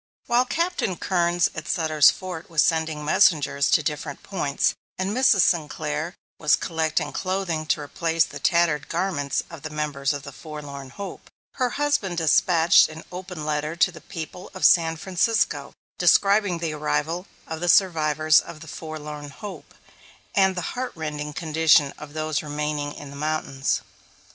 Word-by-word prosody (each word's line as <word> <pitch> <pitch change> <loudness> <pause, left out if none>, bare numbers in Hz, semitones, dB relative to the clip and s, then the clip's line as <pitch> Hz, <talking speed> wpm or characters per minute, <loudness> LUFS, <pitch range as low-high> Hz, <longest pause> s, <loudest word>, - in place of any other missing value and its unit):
While 245 +1 +3
Captain 335 - -1
Kerns 175 -2 +1
at 155 -1 -7
Sutter's 155 -4 +4
Fort 180 -3 -5
was 165 -3 +3
sending 160 -3 0
messengers 145 -3 +3
to 155 - +4
different 145 0 -4
points, 150 -8 0 0.2
and 190 +1 -1
Mrs. 250 -6 +5
Sinclair 160 0 0 0.2
was 150 - +4
collecting 160 -2 -1
clothing 185 -4 -2
to 150 - +1
replace 165 +2 +1
the 145 - -8
tattered 165 -2 +2
garments 165 -6 -1
of 165 -4 -9
the 155 - -6
members 150 -2 -1
of 145 -2 -4
the 140 - -8
Forlorn 140 -2 -8
Hope, 200 +8 -8 0.3
her 255 -2 +1
husband 285 -12 0
despatched 165 +1 +5
an 160 +1 -9
open 180 -3 -7
letter 150 +1 -2
to 180 +2 +3
the 170 - -12
people 175 +1 -8
of 185 - 0
San 165 -2 +5
Francisco, 195 +6 0 0.3
describing 200 -2 +4
the 165 -2 -3
arrival 160 +4 -2 0.2
of 160 0 -6
the 175 +1 -1
survivors 155 -4 +4
of 155 - -9
the 160 - -10
Forlorn 150 -2 -7
Hope, 175 -2 -10 0.6
and 190 -1 +3
the 180 - -3
heart 255 0 -4
rending 150 -2 -4
condition 155 -2 +3
of 150 -1 -10
those 155 -1 -1
remaining 150 -1 -3
in 145 -1 -10
the - - -10
mountains. 145 -2 -1
160 Hz, 155 wpm, -24 LUFS, 150-180 Hz, 0.6 s, Mrs